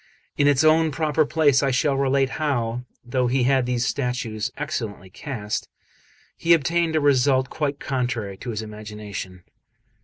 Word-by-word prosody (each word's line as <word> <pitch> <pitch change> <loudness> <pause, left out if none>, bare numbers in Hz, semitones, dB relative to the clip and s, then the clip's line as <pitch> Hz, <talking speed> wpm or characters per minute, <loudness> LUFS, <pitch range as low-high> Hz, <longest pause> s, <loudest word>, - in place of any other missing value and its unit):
In 145 - +3
its 145 0 +4
own 160 +1 +5
proper 155 +1 +1
place 145 -4 +3
I 140 - +1
shall 135 +2 +1
relate 135 0 +1
how, 125 -5 -1 0.2
though 125 0 0
he 125 +1 +1
had 130 -1 +2
these 125 0 0
statues 125 -6 -2
excellently 110 -10 -4
cast, 105 -2 -4 0.7
he 170 +1 +3
obtained 165 +1 +1
a - - +4
result 130 -2 +3
quite 145 -2 -2
contrary 120 -7 -2
to 125 - -7
his 110 -1 -3
imagination. 105 -4 -8
130 Hz, 150 wpm, -23 LUFS, 115-145 Hz, 0.7 s, own